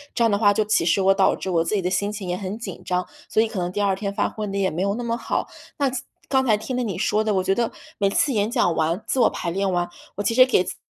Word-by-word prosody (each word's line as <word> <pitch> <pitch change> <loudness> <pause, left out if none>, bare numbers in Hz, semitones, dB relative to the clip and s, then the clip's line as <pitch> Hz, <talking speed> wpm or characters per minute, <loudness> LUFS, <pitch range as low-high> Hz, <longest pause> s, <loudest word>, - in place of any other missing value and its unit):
这 235 - +2
样 230 - +3
的 200 - +2
话， 205 -2 +5
就 210 +1 +1
其 210 -5 +2
实 175 +4 +3
我 195 +1 +5
导 195 -1 +3
致 190 - -4
我 165 -2 +2
自 210 - -1
己 200 - +1
的 180 - 0
心 200 +3 0
情 205 -3 -6
也 180 - -1
很 195 +2 -5
紧 210 -6 -7
张， 180 0 -1 0.2
所 220 - +3
以 - - 0
可 215 -3 -5
能 175 0 -2
第 205 - -4
二 200 -2 +2
天 200 +1 -3
发 200 - 0
挥 215 -1 -5
得 200 0 -3
也 195 -1 +1
没 170 - -3
有 200 +1 +1
那 245 - -4
么 230 0 -1
好。 - - -2 0.3
那 280 -2 +1 0.4
刚 265 -1 +2
才 220 -5 +3
听 220 +5 -5
了 250 - 0
你 210 -7 -3
说 210 +2 +1
的， 215 -2 0
我 185 - +1
觉 190 - +2
得 235 +3 0 0.3
每 200 -1 +3
次 270 +7 +1
演 210 -1 +1
讲 235 -8 +2
完 165 +5 0
自 265 - 0
我 235 - +5
排 170 - -4
练 195 +2 0
完， 175 -1 0 0.3
我 205 - -3
其 215 - +1
实 255 +2 +8
给 255 -7 +3
自 185 - -6
200 Hz, 340 characters per minute, -23 LUFS, 185-220 Hz, 0.4 s, 实